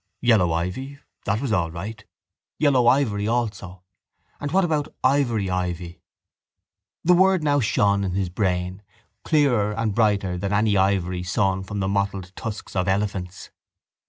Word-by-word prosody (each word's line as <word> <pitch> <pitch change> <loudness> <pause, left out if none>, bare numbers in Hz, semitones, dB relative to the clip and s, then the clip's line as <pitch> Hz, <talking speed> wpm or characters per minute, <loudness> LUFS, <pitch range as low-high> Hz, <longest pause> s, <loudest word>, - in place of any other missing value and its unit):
Yellow 110 -8 +3
ivy; 90 +13 -3 0.3
that 105 +2 0
was 135 -6 -1
all 85 -5 +1
right. 105 +6 -7 0.5
Yellow 135 -5 +3
ivory 115 -6 +2
also. 100 -6 -3 0.6
And 145 - -4
what 190 +2 +3
about 155 -3 -1
ivory 130 -7 +2
ivy? 90 -1 -3 1.0
The 180 - +5
word 190 -1 +4
now 145 -1 +2
shone 100 -4 +2
in 95 -2 -2
his 95 -1 -1
brain, 90 0 -2 0.4
clearer 125 -9 +2
and 110 -1 -1
brighter 100 -5 +1
than 100 +2 -2
any 105 0 +2
ivory 95 -2 +1
sawn 95 +1 0
from 100 +1 -5
the 95 - 0
mottled 100 -2 -2
tusks 110 -2 -6
of 90 -1 0
elephants. 95 -2 -2
100 Hz, 145 wpm, -23 LUFS, 95-120 Hz, 1.0 s, The